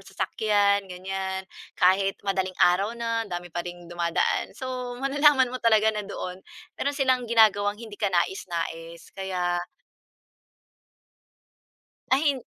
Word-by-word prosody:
sasakyan 205 -2 +1
ganiyan. 190 +1 -4 0.3
Kahit 195 +2 +3
madaling 190 -1 -1
araw 190 +5 +4
na, 230 -1 -1
dami 175 -3 -6
pa 175 +1 -4
ring 175 -1 -9
dumadaan. 170 -1 0
So, 250 -1 -5
malalaman 275 -1 +4
mo 255 - -4
talaga 220 -1 +4
na 210 - -3
doon, 185 -1 -6 0.3
meron 285 0 -2
silang 260 -3 +2
ginagawang 210 -2 +3
hindi 220 -3 -9
ka 205 -3 -1
nais-nais 170 -1 -3
kaya 180 -2 -1 2.5
Ay 270 +3 +4
hin 280 -3 +2
200 Hz, 120 wpm, -26 LUFS, 180-235 Hz, 2.5 s, araw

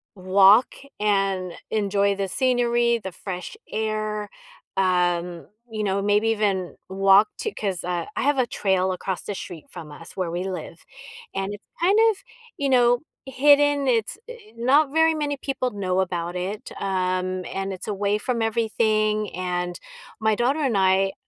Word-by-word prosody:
walk 195 +5 +5 0.2
and 195 -3 +1 0.2
enjoy 200 -1 +1
the 195 0 -2
scenery, 240 -1 +2
the 190 - -5
fresh 180 - -7
air, 215 -1 -2 0.5
um, 175 -2 0 0.2
you 215 -1 -3
know, 200 -1 0
maybe 205 +2 +2
even 200 -5 0
walk 195 +2 +5
to 440 - -2
'cause, 195 -4 -3
uh, 175 -1 -2
I - - -1
have 285 +1 +2
a 255 -2 +2
trail 190 -4 0
across 185 0 -4
the 205 - -5
street 175 -4 -8
from 150 -2 -10
us 155 +3 -12
where 180 -3 -2
we 175 +2 -2
live, 185 -2 -7 0.5
and 195 +1 -2
it's 205 - -11 0.2
kind 390 +5 +4
of, 415 - -7 0.4
you 280 -1 0
know, 245 -2 +4 0.3
hidden, 285 +1 +4
it's 230 - +1
i 485 - -8 0.2
not 275 +5 +3
very 320 +1 +4
many 290 -2 -2
people 270 -2 -2
know 190 -2 -1
about 175 -2 -2
it, 190 +4 -4
um, 185 -1 -1
and 195 0 -4
it's 185 - -7
away 205 0 0
from 235 +1 -2
everything, 215 -1 +1
and 180 -1 -3 0.4
my 220 0 +2
daughter 255 +7 +1
and 270 -7 0
I, 190 0 +3
205 Hz, 160 wpm, -24 LUFS, 185-235 Hz, 0.5 s, walk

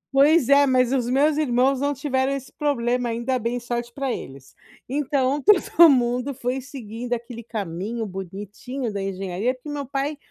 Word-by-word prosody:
Pois 290 0 +5
é, 280 0 +6
mas 255 -1 +2
os 245 -3 0
meus 285 +4 +3
irmãos 265 -1 +2
não 285 0 +1
tiveram 265 -1 0
esse 275 -1 -4
problema, 245 -4 0
ainda 235 +3 -1
bem, 240 +1 -2
sorte 240 0 -4
pra 270 -2 -2
eles. 135 0 -9 0.3
Então 280 0 0
todo 345 -3 +6
mundo 250 +1 +1
foi 255 +1 -3
seguindo 245 -3 -8
aquele 235 0 -4
caminho 215 +1 -4
bonitinho 205 +6 -6
da 200 - -3
engenharia 195 +5 -2
porque 255 +4 -14
meu 290 -1 -4
pai 280 +2 -2
250 Hz, 165 wpm, -23 LUFS, 235-275 Hz, 0.3 s, é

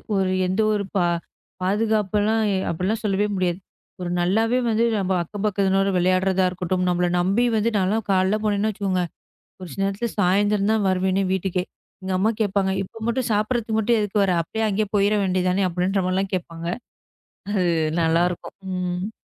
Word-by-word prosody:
ஒரு 190 -1 +1 0.2
எந்த 190 +4 0
ஒரு 200 -1 -1
பா 175 - +3 0.6
பாதுகாப்புலாம் 210 +1 +1 0.3
அப்படியெல்லாம் 190 +7 -1
சொல்லவே 205 -1 +1
முடியாது.ஒரு 180 0 -5
நல்லாவே 225 +8 +2
வந்து 225 +1 +2
நம்ம 190 0 -1
அக்கப்பக்கத்தனோட 195 0 0
விளையாடுறதா 185 +1 +2
இருக்கட்டும், 180 0 -2
நம்மள 180 0 +1
நம்பி 200 +7 +2
வந்து, 220 +2 +2
நான்லாம் 205 +4 0
காலைல 190 +2 +2
போனேன்னு 210 +1 +1
வச்சிக்கோங்க 190 -3 -1 0.6
ஒரு 180 - -7
சில 195 - -3
நேரத்துல 205 +4 -2
சாயந்திரம் 205 +2 +2
தான் 210 -3 +1
வருவேனே 190 +1 +1
வீட்டுக்கே. 185 -1 -1 0.4
எங்க 190 0 -3
அம்மா 215 +4 +2
கேப்பாங்க, 195 -2 +1
'இப்ப 210 +4 -11
மட்டும் 240 +1 0
சாப்பிடறதுக்கு 220 +1 0
மட்டும் 225 +1 +2
எதுக்கு 205 0 +1
வர, 190 - +1
அப்படியே 220 +7 -3
அங்கயே 210 +1 0
போயிட 205 +1 +3
வேண்டியது 185 -1 +1
தானே' 190 +1 +1
அப்படின்ற 185 +3 0
மாதிரி 185 0 0
எல்லாம் 195 0 -1
கேப்பாங்க. 170 -2 -5 0.8
அது 195 -3 +1 0.4
நல்லாருக்கும். 170 +2 0 0.2
ம். 180 +3 -3
195 Hz, 155 wpm, -23 LUFS, 185-210 Hz, 0.8 s, பா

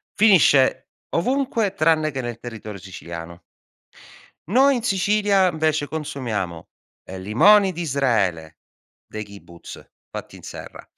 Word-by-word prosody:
finisce 150 -11 +4 0.2
ovunque 230 0 0
tranne 155 -2 +2
che 135 - -4
nel 120 -2 -6
territorio 110 -4 -8
siciliano. 85 -2 -9 1.0
Noi 265 - +4
in 235 - -5
Sicilia, 200 -2 +2
invece, 155 -2 0
consumiamo, 120 - -4 0.4
ehm, 95 0 -9
limoni 190 - +5
d'Israele, 120 - -1 0.5
dei 110 0 -6
kibbutz, 100 -4 -13 0.2
fatti - - -8
in - - -13
serra, - - -10
140 Hz, 110 wpm, -22 LUFS, -, 1.0 s, limoni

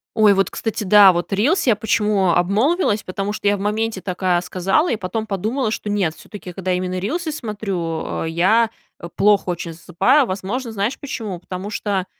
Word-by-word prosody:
Ой, 215 -2 +5
вот, 195 0 +1
кстати, 220 -1 -3
да, 200 -1 +7
вот 175 +2 -3
рилс, 260 - +1
я 235 - +5
почему 210 -2 +1
обмолвилась, 210 - +1
потому 195 +2 -3
что 210 -1 -3
я 205 - +4
в - - -10
моменте 210 0 -1
такая 180 -2 0
сказала, 190 - 0
и - - +1
потом 215 +2 -4
подумала, 220 +5 -1
что 210 - -4
нет, 190 -6 0
все-таки 200 -3 -10
когда 185 +1 -2
именно 180 0 -2
рилсы 315 - -2
смотрю, 195 - -4 0.2
а, - - -3
я 190 +8 +3 0.3
очень 170 - -9
плохо 200 -3 +3
засыпаю. 175 - +1
Возможно, 215 +5 -4
знаешь 215 +4 -2
почему? 220 -9 -5
Потому 185 +3 -6
что 200 -3 -2
200 Hz, 175 wpm, -20 LUFS, 185-220 Hz, 0.3 s, да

